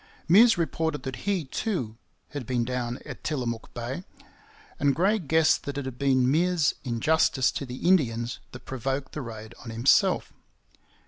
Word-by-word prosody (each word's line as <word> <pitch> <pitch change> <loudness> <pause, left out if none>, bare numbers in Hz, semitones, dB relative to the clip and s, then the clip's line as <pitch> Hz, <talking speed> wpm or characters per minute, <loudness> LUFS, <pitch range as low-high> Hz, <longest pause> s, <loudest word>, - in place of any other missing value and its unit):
Meares 220 +6 +7
reported 160 -2 -1
that 130 -2 -4
he, 185 -6 0
too, 130 - -3 0.3
had 140 -5 -6
been 125 -2 0
down 125 0 -2
at - - -9
Tillamook 120 -7 -3
Bay; 120 +8 -4 0.8
and 140 -2 +2
Gray 200 +6 +2
guessed 160 -1 +3
that 140 0 -4
it 140 - -3
had 130 -2 -7
been 130 -2 +3
Meares's 165 +3 +2
injustice 130 +2 +2
to 140 - -5
the 125 +6 -4
Indians 120 -10 +2
that 125 0 -11
provoked 135 +2 -3
the 150 - -5
raid 110 -2 -8
on 115 - -8
himself. 115 +4 +3
135 Hz, 155 wpm, -27 LUFS, 120-160 Hz, 0.8 s, Meares